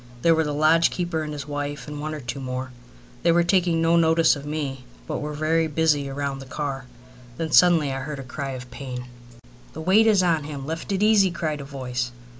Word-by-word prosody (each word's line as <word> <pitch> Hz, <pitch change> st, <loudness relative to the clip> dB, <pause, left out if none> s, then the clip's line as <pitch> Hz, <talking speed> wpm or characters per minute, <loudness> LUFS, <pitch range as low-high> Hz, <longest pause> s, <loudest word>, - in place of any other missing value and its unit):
There 165 Hz, -, +6 dB
were 160 Hz, 0 st, +2 dB
the 150 Hz, -, -2 dB
lodge 155 Hz, +3 st, +4 dB
keeper 175 Hz, -3 st, -2 dB
and 155 Hz, -1 st, -4 dB
his 145 Hz, -1 st, -6 dB
wife, 145 Hz, 0 st, -4 dB
and 150 Hz, 0 st, -6 dB
one 155 Hz, +1 st, -4 dB
or -, -, -6 dB
two 130 Hz, +1 st, -5 dB
more. 130 Hz, 0 st, -4 dB, 0.5 s
They 170 Hz, -, +4 dB
were 170 Hz, +1 st, +4 dB
taking 170 Hz, -2 st, +2 dB
no 165 Hz, +1 st, +4 dB
notice 165 Hz, -1 st, +4 dB
of 145 Hz, 0 st, -8 dB
me, 140 Hz, -4 st, -4 dB, 0.2 s
but -, -, -3 dB
were 150 Hz, 0 st, -4 dB
very 160 Hz, +2 st, +1 dB
busy 150 Hz, -2 st, +1 dB
round 140 Hz, 0 st, -3 dB
the 135 Hz, -, -10 dB
car. 135 Hz, -2 st, -4 dB, 0.5 s
Then 160 Hz, -1 st, -3 dB
suddenly 165 Hz, -6 st, +5 dB
I 135 Hz, -, -3 dB
heard 150 Hz, +1 st, -5 dB
a 135 Hz, -, -6 dB
cry 135 Hz, +1 st, -5 dB
of 125 Hz, -1 st, -8 dB
pain. 125 Hz, -1 st, -6 dB, 0.7 s
"The 160 Hz, -, -7 dB
weight 200 Hz, +7 st, +4 dB
is 205 Hz, -4 st, +4 dB
on 165 Hz, -4 st, +1 dB
him. 145 Hz, -2 st, -6 dB
Lift 160 Hz, +5 st, -5 dB
it 195 Hz, +1 st, +1 dB
easy," 210 Hz, -3 st, +5 dB
cried 155 Hz, -4 st, -3 dB
a -, -, -8 dB
voice. 125 Hz, -3 st, -4 dB
150 Hz, 225 wpm, -24 LUFS, 140-165 Hz, 0.7 s, There